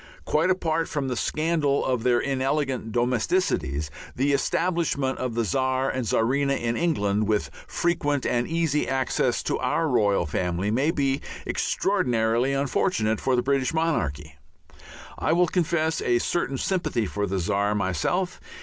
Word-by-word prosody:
Quite 160 +4 +2
apart 165 -3 0
from 140 -4 -2
the 125 - -1
scandal 155 +1 0
of 125 -3 0
their 120 0 +3
inelegant 135 -3 -1
domesticities, 120 - 0 0.2
the 140 +3 +1
establishment 160 -4 0
of 125 -3 -3
the 115 -1 +1
Czar 130 +6 0
and 130 -3 -3
Czarina 140 +6 +2
in 115 0 -1
England 105 -11 +1
with 105 -1 0 0.2
frequent 145 -5 0
and 120 0 0
easy 160 -3 0
access 135 -1 0
to - - -1
our 165 - 0
royal 105 - +2
family 90 +5 -1
may 135 +7 +2
be 140 -4 0 0.2
extraordinarily 120 - +1
unfortunate 135 - 0
for 130 - +2
the 125 - +1
British 135 +2 0
monarchy. 80 - -1 0.8
I - - +1
will 175 +1 +4
confess 165 -2 0
a 120 -1 +2
certain 135 +1 -1
sympathy 150 - -1
for 105 +1 -2
the 95 +1 -2
Czar 100 +3 0
myself. 105 - -1
130 Hz, 145 wpm, -25 LUFS, 110-155 Hz, 0.8 s, will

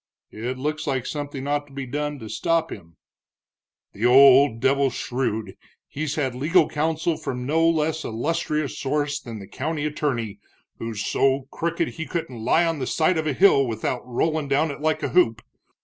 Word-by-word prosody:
"It 120 +4 -4
looks 150 +4 -3
like 130 -3 -1
something 145 -2 -5
ought 145 0 -1
to 140 - -18
be 135 -1 -5
done 150 +3 -3
to 110 -4 -9
stop 165 +7 0
him." 85 -1 -10 1.0
"The 100 - -7
old 135 -1 +7
devil's 135 0 +2
shrewd, 120 -4 -2 0.3
he's 155 +1 -3
had 135 -5 -1
legal 155 +6 +3
counsel 160 +1 -1
from 125 -1 -4
no 165 +4 +3
less 160 -1 0
illustrious 150 +4 -2
source 145 +1 -1
than 115 -5 -8
the 100 - -9
county 150 +7 -3
attorney, 125 -9 -2 0.4
who's 110 -2 -4
so 135 0 +1
crooked 170 0 -1
he 160 -1 -6
couldn't 130 -10 -4
lie 165 +8 +3
on 165 -2 -1
the 130 - -3
side 160 +1 +2
of 155 - -2
a 150 - +1
hill 140 -5 +5
without 115 +2 -2
rollin' 150 +5 -1
down 145 +3 +1
it 140 - -9
like 155 0 0
a - - 0
hoop. 115 -11 +2
145 Hz, 180 wpm, -24 LUFS, 125-155 Hz, 1.0 s, old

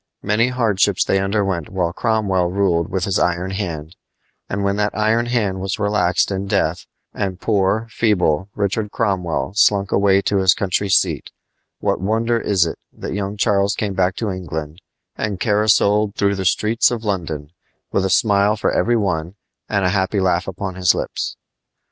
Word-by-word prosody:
Many 105 +4 +2
hardships 105 -6 +1
they 95 - +2
underwent 95 -4 -1
while 90 -3 -1
Cromwell 100 -6 0
ruled 90 -3 +1
with 95 -2 -2
his 100 -2 0
iron 90 +2 0
hand; 85 -4 -5 0.5
and 100 +1 -2
when 100 0 +1
that 105 0 -1
iron 110 +2 +2
hand 105 -6 0
was 95 0 -2
relaxed 105 -3 +1
in 95 0 -3
death, 90 -4 0 0.3
and 95 -2 -3
poor, 105 +1 +1
feeble 95 -6 +1
Richard 105 +1 -1
Cromwell 95 - -1
slunk 100 -1 +3
away 100 -1 +3
to 100 - +1
his 95 -1 +4
country 100 +1 -1
seat, - - +1 0.5
what - - 0
wonder 115 +4 +1
is 95 -6 +2
it 80 - -5
that - - -6
young 100 +1 -3
Charles 100 0 +2
came 105 -2 -2
back 95 -1 +1
to 110 -4 -2
England 80 -2 -6 0.3
and 100 -3 -3
caracoled 105 -1 +2
through 100 0 +1
the 95 -1 -3
streets 110 +5 +2
of 120 -2 -4
London 80 -8 -3 0.4
with 95 - +1
a 95 - 0
smile 105 -1 +3
for 105 - 0
every 120 0 +2
one 90 -4 -2 0.3
and 100 -2 +1
a - - +3
happy 95 +1 0
laugh 90 -1 +1
upon 95 0 -4
his 90 -1 +2
lips? - - -4
100 Hz, 170 wpm, -20 LUFS, 95-105 Hz, 0.5 s, his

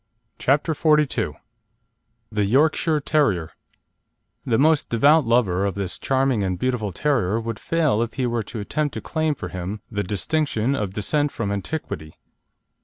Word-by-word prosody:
CHAPTER 145 +4 +2
XLII 150 -6 +2 1.0
THE 105 -1 0
YORKSHIRE 150 +6 +2
TERRIER 105 - +1 0.9
The 115 -3 +1
most 155 +2 +3
devout 145 +6 +4
lover 105 -6 +2
of 100 -3 -1
this 100 -3 -4
charming 135 -4 +1
and 95 -2 -1
beautiful 115 -2 -1
terrier 115 - +1
would 115 -2 -5
fail 155 -9 +1
if 120 0 -3
he 130 - 0
were 120 -1 0
to 110 +2 -7
attempt 145 +8 -2
to - - -4
claim 155 -2 -1
for - - -6
him 95 +3 -5
the 105 -2 -1
distinction 115 - 0
of 100 -7 -3
descent 145 +8 0
from 105 -3 -3
antiquity. 100 - -5
120 Hz, 150 wpm, -23 LUFS, 100-150 Hz, 1.0 s, devout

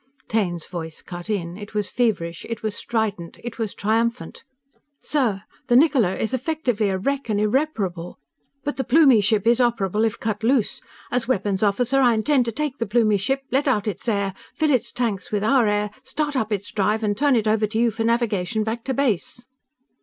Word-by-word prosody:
Taine's 180 -7 -1
voice 160 -3 -7
cut 175 +2 -8
in. 175 -4 -2
It 205 0 -10
was 210 -1 -1
feverish. 190 -9 -1
It 230 -2 -5
was 215 -2 -1
strident. 210 -7 -3
It 240 0 -7
was 220 -3 -3
triumphant. 230 +3 -1 0.6
"_Sir! 235 -10 0 0.2
The 240 - +3
Niccola 255 - +4
is 220 - -2
effectively 255 -6 0
a 190 - 0
wreck 275 +5 -2
and 205 -1 +1
unrepairable. 210 - -1 0.5
But 290 - -3
the 265 - 0
Plumie 265 -3 +5
ship 210 0 +2
is 235 +1 +4
operable 220 -4 +1
if 225 -2 0
cut 215 -1 -2
loose. 240 -2 +1 0.3
As 245 -2 0
weapons 200 -5 0
officer, 245 +6 +2
I 240 -3 +4
intend 250 +3 +2
to 230 - -1
take 285 +2 -3
the 230 - -1
Plumie 215 -2 +3
ship, 270 +7 -1
let 280 +3 +1
out 215 -6 +1
its 210 +3 -2
air, 200 -3 0 0.2
fill 310 -1 +2
its 245 -3 +1
tanks 225 -6 -2
with 205 -1 0
our 245 0 +4
air, 205 0 0
start 295 -2 -2
up 220 -4 -1
its 205 -1 -2
drive, 210 +2 0
and 205 -1 +1
turn 285 +4 +3
it 220 -2 +1
over 215 0 +2
to 220 +2 -3
you 235 0 +3
for 225 +1 -3
navigation 220 -3 0
back 225 +2 -3
to 265 - -1
base! 240 -2 -1
220 Hz, 200 wpm, -23 LUFS, 205-250 Hz, 0.6 s, Plumie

